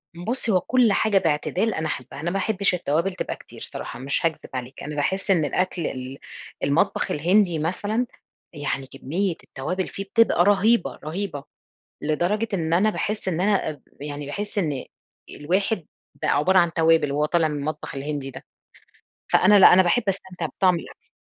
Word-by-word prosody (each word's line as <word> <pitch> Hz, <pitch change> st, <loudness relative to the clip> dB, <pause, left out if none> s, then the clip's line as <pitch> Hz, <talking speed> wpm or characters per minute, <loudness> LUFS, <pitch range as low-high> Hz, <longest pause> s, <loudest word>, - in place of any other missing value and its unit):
بُصّ، 230 Hz, +7 st, -2 dB
هو 185 Hz, -3 st, +3 dB
كل 245 Hz, -1 st, +3 dB
حاجة 215 Hz, -2 st, +2 dB
باعتدال 180 Hz, +5 st, +1 dB
أنا 155 Hz, 0 st, -2 dB
أحبها، 130 Hz, -1 st, -6 dB
أنا 175 Hz, +2 st, -1 dB
ما 195 Hz, -, -1 dB
احبش 200 Hz, -1 st, +1 dB
التوابل 170 Hz, +2 st, 0 dB
تبقى 180 Hz, -, -4 dB
كتير -, -, -14 dB
صراحة -, -, -6 dB
مش 140 Hz, +5 st, 0 dB
هاكذب 165 Hz, -2 st, -2 dB
عليك، 130 Hz, +1 st, -6 dB
أنا 150 Hz, +1 st, -5 dB
باحس 190 Hz, +7 st, 0 dB
إن 165 Hz, -5 st, +3 dB
الأكل 180 Hz, +3 st, -1 dB
ال 130 Hz, +1 st, -6 dB, 0.5 s
المطبخ 170 Hz, +8 st, +1 dB
الهندي 175 Hz, +2 st, +2 dB
مثلًا، 205 Hz, +9 st, -1 dB, 0.5 s
يعني 145 Hz, -2 st, -3 dB
كمية 170 Hz, +8 st, -2 dB
التوابل 180 Hz, +8 st, -3 dB
فيه 195 Hz, -, -6 dB
بتبقى 200 Hz, -4 st, +3 dB
رهيبة 205 Hz, +1 st, +3 dB
رهيبة 155 Hz, -2 st, -4 dB, 0.6 s
لدرجة 175 Hz, +9 st, 0 dB
إن 165 Hz, -4 st, 0 dB
أنا 195 Hz, +5 st, +4 dB
باحس 210 Hz, -1 st, -3 dB
إن 175 Hz, -1 st, 0 dB
أنا 200 Hz, -3 st, +2 dB
آآ، 150 Hz, -, -8 dB, 0.2 s
يعني 145 Hz, 0 st, -5 dB
باحس 205 Hz, +9 st, -5 dB
إن 150 Hz, -9 st, -1 dB, 0.4 s
الواحد 185 Hz, +4 st, -1 dB, 0.4 s
بقى -, -, 0 dB
عبارة 185 Hz, +6 st, +4 dB
عن 170 Hz, -1 st, +2 dB
توابل 160 Hz, -3 st, +3 dB
وهو 150 Hz, +1 st, +1 dB
طالع 165 Hz, +1 st, +2 dB
من 150 Hz, -1 st, -3 dB
المطبخ 145 Hz, +1 st, -4 dB
الهندي 140 Hz, -1 st, -4 dB
ده، 130 Hz, -, -11 dB, 0.9 s
فأنا 210 Hz, +3 st, +6 dB
لأ -, -, +9 dB
أنا 185 Hz, +1 st, +7 dB
باحب 185 Hz, +7 st, +2 dB
أستمتع 185 Hz, -3 st, -3 dB
بطعم 185 Hz, +2 st, +2 dB
الأكل. -, -, -13 dB
175 Hz, 170 wpm, -24 LUFS, 150-195 Hz, 0.9 s, لأ